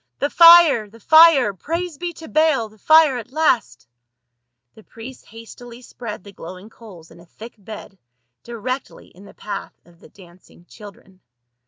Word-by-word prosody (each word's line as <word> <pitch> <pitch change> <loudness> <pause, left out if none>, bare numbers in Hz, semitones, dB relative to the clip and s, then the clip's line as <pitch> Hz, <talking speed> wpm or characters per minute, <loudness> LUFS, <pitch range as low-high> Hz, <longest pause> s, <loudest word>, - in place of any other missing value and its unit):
" - - -57
The 285 - -3
fire! 335 -10 +6
the 230 +3 -19
fire! 315 -6 +4
Praise 330 - -6
be 350 0 -5
to 320 0 -13
Baal, 310 -8 0
the 215 0 -24
fire 315 -1 +3
at 235 +2 -13
last 275 - -2 0.4
!" 120 0 -59
The 220 - -18
priests 230 +4 -14
hastily 235 +2 -14
spread 225 -6 -10
the 200 - -14
glowing 185 +3 -13
coals 185 -9 -16
in - - -18
a 170 - -18
thick 225 +7 -14
bed 205 -2 -13 0.4
directly 245 +3 -8
in 190 +3 -19
the - - -17
path 210 - -9
of 170 -1 -24
the - - -19
dancing 175 -2 -21
children. 195 -2 -17
225 Hz, 170 wpm, -19 LUFS, 195-285 Hz, 0.4 s, fire